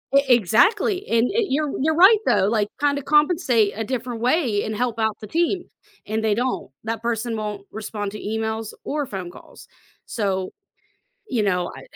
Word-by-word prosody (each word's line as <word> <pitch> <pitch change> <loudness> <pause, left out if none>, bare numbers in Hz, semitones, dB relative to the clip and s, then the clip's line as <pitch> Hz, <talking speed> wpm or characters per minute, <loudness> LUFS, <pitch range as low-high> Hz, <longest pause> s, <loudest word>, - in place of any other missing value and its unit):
E 280 - +7
exactly, 355 - +3
and 230 +1 +3
e 450 -1 +1
you're 290 +1 0
you're 315 +2 +2
right 385 +6 +7
though, 190 - +3
like, 210 -1 +1
kinda 285 0 +1
compensate 295 - +3
a 225 - -3
different 240 -1 -4
way 250 -5 +1
and 215 - -3
help 235 0 -2
out 220 -1 0
the 215 - -9
team, 345 - 0 0.4
and 220 +1 -2
they 215 - +2
don't, 245 +4 -2
that 225 0 -3
person 230 0 -2
won't 210 -2 -4
respond 210 -1 -5
to 210 - -7
emails 220 0 -3
or 295 -1 -2
phone 190 -6 -6
calls, - - -15 0.4
so, 190 -4 -2 0.8
you 230 -4 0
know, 180 -3 0
I - - -10
230 Hz, 175 wpm, -22 LUFS, 210-285 Hz, 0.8 s, E